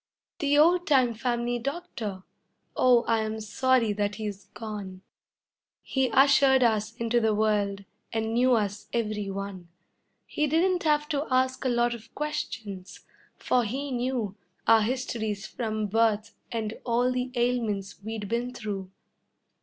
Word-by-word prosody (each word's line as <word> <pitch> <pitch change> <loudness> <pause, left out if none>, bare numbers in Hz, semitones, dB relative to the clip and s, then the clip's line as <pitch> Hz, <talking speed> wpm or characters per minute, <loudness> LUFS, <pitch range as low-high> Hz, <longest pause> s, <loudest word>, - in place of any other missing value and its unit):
The 290 0 +2
old 345 +4 +5
time 255 -5 +4
family 240 +1 -1
doctor! 240 - -5 0.5
Oh, 245 -2 +5
I 230 -1 +1
am 220 0 -2
sorry 230 +1 +2
that 205 0 -1
he's 205 -2 -5
gone, 200 -4 -7 0.8
He 265 -2 0
ushered 270 -1 +5
us 220 -1 +1
into 235 0 +1
the 220 -2 +2
world 205 -2 0 0.3
and 225 0 -1
knew 250 +1 +4
us 205 -2 -2
every 215 -3 -1
one; 195 -2 -6 0.6
He 300 - -1
didn't 350 +4 +2
have 300 -1 +2
to 295 -1 -1
ask 255 0 +1
a - - +3
lot 240 0 +2
of 230 -2 -11
questions, 220 -10 -5 0.4
for 250 -1 +2
he 270 +6 -3
knew 245 -5 -1 0.3
Our 225 -1 +6
histories 220 -3 -2
from 220 -3 -3
birth 220 0 +1 0.2
and 220 -2 -2
all 245 +1 +2
the 250 0 -1
ailments 225 -6 -1
we'd 220 0 -5
been 240 +3 -2
through. 200 -4 -5
230 Hz, 140 wpm, -27 LUFS, 210-255 Hz, 0.8 s, Our